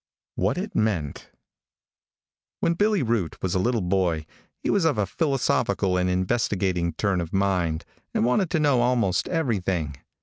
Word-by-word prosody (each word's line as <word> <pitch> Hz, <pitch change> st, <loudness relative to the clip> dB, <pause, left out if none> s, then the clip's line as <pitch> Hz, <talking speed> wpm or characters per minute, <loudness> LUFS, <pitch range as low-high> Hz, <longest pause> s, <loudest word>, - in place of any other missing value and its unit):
WHAT -, -, 0 dB
IT -, -, -4 dB
MEANT. 95 Hz, -10 st, -1 dB, 1.3 s
|WHEN 170 Hz, -, +2 dB
Billy 205 Hz, -1 st, +2 dB
Boot 110 Hz, -8 st, -1 dB
was 95 Hz, -, 0 dB
a 95 Hz, -, +1 dB
little 115 Hz, +3 st, +1 dB
boy, 90 Hz, -4 st, 0 dB, 0.4 s
he -, -, +1 dB
was 200 Hz, -, +2 dB
of 160 Hz, -6 st, +2 dB
a 105 Hz, -, +2 dB
philosophical 120 Hz, -, 0 dB
and 90 Hz, 0 st, +1 dB
investigating 90 Hz, -3 st, 0 dB
turn 95 Hz, 0 st, 0 dB
of 85 Hz, -, -6 dB
mind, 90 Hz, -5 st, 0 dB, 0.3 s
and -, -, +1 dB
wanted 160 Hz, -, +2 dB
to 170 Hz, -, +1 dB
know 140 Hz, -5 st, +3 dB
almost 120 Hz, -7 st, +1 dB
everything. 95 Hz, -, -1 dB
100 Hz, 155 wpm, -25 LUFS, 90-125 Hz, 1.3 s, know